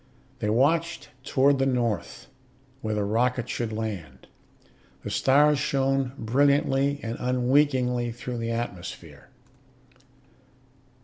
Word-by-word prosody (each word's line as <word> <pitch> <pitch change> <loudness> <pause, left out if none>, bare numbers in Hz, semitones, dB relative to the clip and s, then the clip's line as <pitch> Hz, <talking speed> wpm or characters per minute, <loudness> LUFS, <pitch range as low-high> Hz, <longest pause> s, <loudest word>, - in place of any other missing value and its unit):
They 105 - -1
watched 160 +8 +1
toward 140 0 +3
the 135 - +2
north, 120 -8 -2 0.6
where 110 0 -2
the 105 - 0
rocket 120 +4 0
should 120 -2 -3
land. 110 -6 -5 0.8
The - - -5
stars 145 +2 +4
shone 135 -2 0
brilliantly 140 +3 +2
and 115 0 -4
unwinkingly 125 -1 +1
through 120 0 -6
the 115 0 -3
atmosphere. 115 -6 -6
125 Hz, 105 wpm, -26 LUFS, 115-135 Hz, 0.8 s, stars